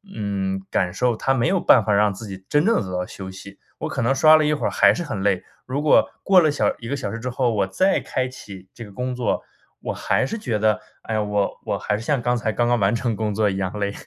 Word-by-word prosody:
嗯， 95 -2 -2
感 90 -1 +1
受， 125 -2 +1
它 135 +5 0
没 120 - +1
有 190 - +2
办 125 -8 +5
法 105 - +2
让 105 0 +3
自 105 +4 -9
己 95 -1 -9
真 150 +3 +2
正 230 - +3
地 - - 0
得 90 - -3
到 90 - -2
休 95 -1 -9
息。 100 +1 -11 0.2
我 - - -3
可 - - -3
能 125 +4 +2
刷 155 +3 +7
了 155 - +2
一 150 - +2
会 150 - -2
儿 - - 0
还 - - +5
是 175 - -3
很 110 -11 -4
累， 95 -2 +1 0.2
如 135 +3 -2
果 155 - +4
过 190 -2 +6
了 155 - +3
小 145 - +1
1 115 - -8
个 140 - -2
小 100 -7 -4
时 115 - -5
之 125 +2 -4
后， 125 -2 0
我 100 -2 0
再 190 - +2
开 130 0 -2
启 95 -7 -12
这 120 - -9
个 100 - -13
工 125 +3 -3
作， 125 -2 -1 0.4
我 - - -3
还 - - 0
是 135 - -4
觉 120 - -2
得： 105 0 +2 0.2
“哎 115 - -4
呀， 110 - +1
我 105 -1 -1
我 - - -1
还 105 - -1
是 - - -7
像 140 +2 0
刚 120 +1 +1
才 110 -2 -1
刚 120 0 +1
刚 120 -1 +2
完 100 +3 +2
成 115 0 -1
工 105 -1 -2
作 110 -1 +2
一 95 - -3
样 95 +1 -3
累。” 100 0 -1
110 Hz, 305 characters per minute, -22 LUFS, 100-130 Hz, 0.4 s, 刷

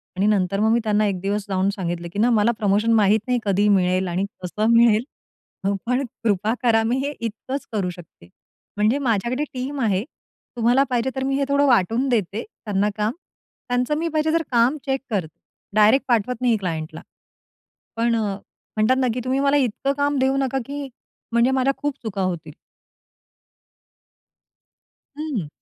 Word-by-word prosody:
आणि 190 +2 +1
नंतर 195 -2 +1
मग 220 +1 +3
मी 235 - +3
त्यांना 215 -1 +2
एक 190 -2 -2
दिवस 200 +1 -2
जाऊन 190 0 +1
सांगितलं 175 -2 -3
की 205 - -3
ना, 235 +3 +4
"मला 225 0 +3
प्रमोशन 210 +2 +2
माहीत 210 0 +4
नाही, 250 -1 +1
कधी 200 +1 +2
मिळेल 185 -1 +2
आणि 180 +3 -1 0.2
कसं 210 +5 -1
मिळेल, 230 -1 +5 0.8
पण 250 +3 +1 0.2
कृपा 215 0 +1
करा 225 -2 +4
मी 235 +3 0
हे 290 - -2
इतकंच 230 +5 -5
करू 200 -5 -1
शकते, 170 - -13 0.5
म्हणजे 215 +6 +3
माझ्याकडे 245 +1 0
टीम 270 +2 -4
आहे. 200 -3 +1 0.5
तुम्हाला 240 +3 +3
पाहिजे, 245 0 0
तर 265 - -2
मी 270 0 0
हे 280 - +1
थोडं 280 0 +3
वाटून 235 +3 +2
देते 215 -2 -1
त्यांना 210 -2 -2
काम 215 +1 +1 0.6
त्यांचं 250 +4 0
मी 330 +2 -1
पाहिजे 315 -1 0
तर, 330 - +3
काम 245 +4 +3
चेक 270 -1 -1
करते, 180 -8 -3 0.4
डायरेक्ट 215 +5 +5
पाठवत 240 0 0
नाही 240 -3 +3
क्लायंटला." 160 -4 -4 0.9
पण 230 +1 +1
म्हणतात 215 +3 -2
ना, 260 -1 +2
की 250 - -3
"तुम्ही 260 +1 0
मला 280 +1 +3
इतकं 275 +1 0
काम 285 0 +1
देऊ 265 +1 +2
नका 270 -1 0
,की 280 +1 -5 0.4
म्हणजे 235 +2 +3
माझ्या 265 +1 +2
खूप 290 -1 -2
चुका 205 -3 -3
होतील." 170 -5 -3 2.7
हं. 270 - -3
225 Hz, 165 wpm, -22 LUFS, 200-260 Hz, 2.7 s, मिळेल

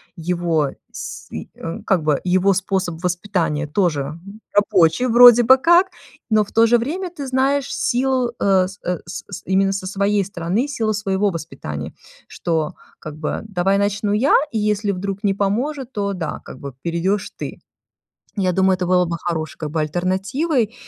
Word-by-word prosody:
его, 170 -3 0 0.2
с - - -8
э, - - -5 0.4
как 190 -4 +2
бы, 150 -2 +1
его 185 +2 +3
способ 190 -3 -2
воспитания 175 -4 -1
тоже 150 -4 0 0.4
рабочий 200 0 +3
вроде 240 0 +8
бы 260 +3 +7
как. 345 +6 +5 0.4
Но 215 -1 +3
в - - -17
то 225 +1 +5
же 240 +1 +4
время 335 +11 -3
ты 290 -6 -7
знаешь 265 +1 +1
силу, 255 -1 +1
э, 190 -2 +3
с 195 +2 -12
с 175 0 -5
с 200 - -7
именно 195 +1 +2
со 195 -1 -4
своей 200 +1 +1
стороны, 190 +7 -2
силу 225 -6 -1
своего 200 -1 0
воспитания, 135 - -6 0.4
что, 160 -3 -2 0.2
как 155 0 -8
бы: 155 - -3
давай 195 0 +1
начну 205 0 0
я, 245 +7 +3 0.2
и - - 0
если 210 0 0
вдруг 195 +2 -4
не 195 - +3
поможет, 245 +7 -2
то, 200 -3 -2
да, 175 -4 -4
как - - -10
бы, 140 -1 -7
перейдёшь 180 +4 -1
ты. - - -7 0.8
Я 185 -2 +2
думаю, 190 +1 +3
это 180 0 -2
было 180 0 +3
бы 170 0 -3
хорошей, 160 -3 -3
как 155 -2 -5
бы, 160 +1 -1
альтернативой 200 - -1
195 Hz, 165 wpm, -20 LUFS, 175-220 Hz, 0.8 s, вроде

